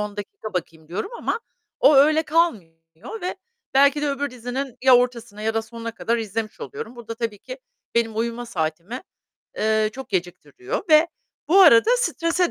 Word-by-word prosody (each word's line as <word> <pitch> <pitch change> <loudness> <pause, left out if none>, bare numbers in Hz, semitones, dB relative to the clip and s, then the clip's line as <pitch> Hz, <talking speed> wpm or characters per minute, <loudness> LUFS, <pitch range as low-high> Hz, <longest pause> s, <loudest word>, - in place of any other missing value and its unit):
10 210 0 -4
dakika 205 +1 -7
bakayım 160 -2 -5
diyorum 195 - -4
ama 455 - -2 0.4
o 300 - +6
öyle 310 +3 +5
kalmıyor 305 - 0 0.5
ve 365 +1 -3 0.4
belki 280 +2 +5
de 290 - +1
öbür 280 0 -2
dizinin 250 +1 -5
ya 255 -2 +8
ortasına 235 -4 -2
ya 220 0 0
da 225 - 0
sonuna 230 0 -7
kadar 230 0 -1
izlemiş 220 0 -4
oluyorum. 425 - -7
Burada 230 -1 -7
tabii 225 -3 -4
ki - - -9 0.4
benim 225 -2 +1
uyuma 235 +1 -2
saatimi, 170 - -4 0.6
eee, 215 0 +2
çok 265 +2 -8
geciktiriyor 195 - -4
ve 310 +2 +6 0.4
bu 385 +4 +6
arada 315 - +7
strese 350 -6 0
235 Hz, 165 wpm, -23 LUFS, 215-300 Hz, 0.6 s, ya